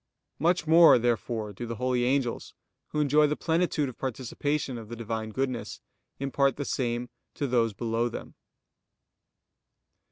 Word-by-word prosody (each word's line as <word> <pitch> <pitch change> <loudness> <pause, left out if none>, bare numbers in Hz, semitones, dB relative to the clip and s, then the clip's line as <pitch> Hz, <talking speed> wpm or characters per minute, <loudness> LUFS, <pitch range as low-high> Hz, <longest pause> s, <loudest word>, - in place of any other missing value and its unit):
Much 170 +1 +2
more 165 -1 +8
therefore 115 -2 -1
do 120 +5 -6
the 115 - -4
holy 125 +1 0
angels, 130 -2 -1 0.3
who 150 - -3
enjoy 150 +1 +4
the 150 - 0
plenitude 165 -3 0
of 130 - -9
participation 130 +1 -2
of 110 -2 -11
the 120 - -5
Divine 110 -1 -4
goodness, 130 +1 -3 0.4
impart 140 0 +1
the 145 - -4
same 120 -2 -1 0.3
to 145 - -2
those 120 -4 +1
below 115 +1 -1
them. - - -8
125 Hz, 140 wpm, -28 LUFS, 115-145 Hz, 0.4 s, more